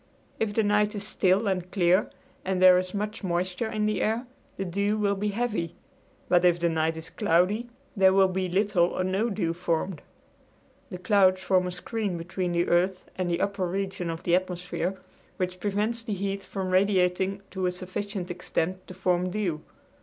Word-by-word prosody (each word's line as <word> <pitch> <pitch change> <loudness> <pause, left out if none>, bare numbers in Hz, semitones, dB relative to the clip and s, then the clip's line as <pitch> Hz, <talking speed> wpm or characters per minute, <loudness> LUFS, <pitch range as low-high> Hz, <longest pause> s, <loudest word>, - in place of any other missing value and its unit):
If 210 -2 -1
the 225 - +3
night 210 0 +2
is 200 -1 -4
still 200 0 +2
and 185 -2 -1
clear 180 +1 +3 0.3
and 190 -1 -1
there 185 -1 +8
is 185 +1 -4
much 210 +2 -3
moisture 180 +4 -1
in 215 -1 -1
the 215 -3 0
air, 225 +4 0 0.3
the 195 - -2
dew 200 +4 0
will 205 -1 +2
be 200 +1 -2
heavy, 210 -6 -2 0.5
but 175 0 +4
if 175 -1 +4
the 170 0 +2
night 160 0 0
is 160 0 -8
cloudy 200 +8 +1 0.3
there 190 -2 +5
will 190 0 +5
be 185 0 -2
little 190 -1 +3
or 185 - -2
no 195 +5 0
dew 195 -6 -1
formed. 170 0 -2 0.9
The 180 - -6
clouds 185 -1 +3
form 185 -1 +2
a - - -3
screen 195 +1 -3
between 175 +2 -3
the 170 0 +1
earth 180 +2 +1
and 185 -1 -2
the 170 +1 0
upper 200 -2 0
regions 190 -1 -3
of 165 - -7
the 175 - +1
atmosphere, 180 +1 -1 0.4
which 185 0 -2
prevents 210 +4 -1
the 225 -2 -4
heat 195 0 -3
from 190 -2 -4
radiating 190 0 +2
to 190 -1 -1
a - - +1
sufficient 185 +1 -5
extent 180 +1 -3
to 185 - -9
form 180 -1 +1
dew. 180 -6 -2
185 Hz, 185 wpm, -27 LUFS, 180-205 Hz, 0.9 s, there